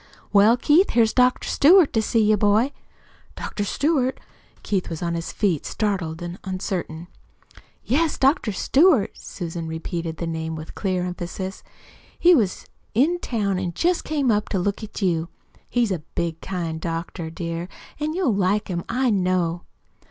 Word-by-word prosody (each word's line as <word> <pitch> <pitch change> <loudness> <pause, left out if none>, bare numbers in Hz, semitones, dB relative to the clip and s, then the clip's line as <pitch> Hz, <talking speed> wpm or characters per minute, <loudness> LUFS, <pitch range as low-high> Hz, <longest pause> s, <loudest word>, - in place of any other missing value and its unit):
"Well, 210 +4 +6
Keith, 315 +9 +4
here's 225 -2 +3
Dr. 250 0 +3
Stewart 340 +2 +5
to 225 - +2
see 225 +1 +2
you 215 0 +4
boy." 210 +6 +3 0.6
"Dr. 205 - -4
Stewart?" 270 +4 0 0.4
Keith 195 -3 -1
was 165 0 -5
on 170 -1 -1
his 165 0 -4
feet, 185 -8 0
startled, 185 -6 -2 0.2
uncertain. 185 -3 -4 0.8
"Yes, 310 +5 +1
Dr. 270 -4 +2
Stewart.'" 270 - +3
Susan 170 -2 -6
repeated 160 0 -4
the 170 - -3
name 160 -1 -3
with 155 0 -8
clear 185 -3 -1
emphasis. 180 +2 -5 0.6
"He 355 +1 +6
was 215 - +1 0.3
in 320 +9 +3
town 200 - -1
an' 180 -2 -3
jest 350 +1 +1
came 285 -5 +1
up 210 0 0
to 195 - 0
look 200 +4 -1
at 215 -1 -6
you. 170 -2 0 0.4
He's 240 -4 +1
a 180 - -1
big, 165 +1 -4
kind 170 -4 -4
doctor, 165 0 -4
dear, 165 +1 -4 0.3
an' 305 +2 -2
you'll 350 - +1
like 200 +2 +1
him, 170 -2 -2
I 255 0 +1
know." 180 -3 0
195 Hz, 155 wpm, -23 LUFS, 170-245 Hz, 0.8 s, Well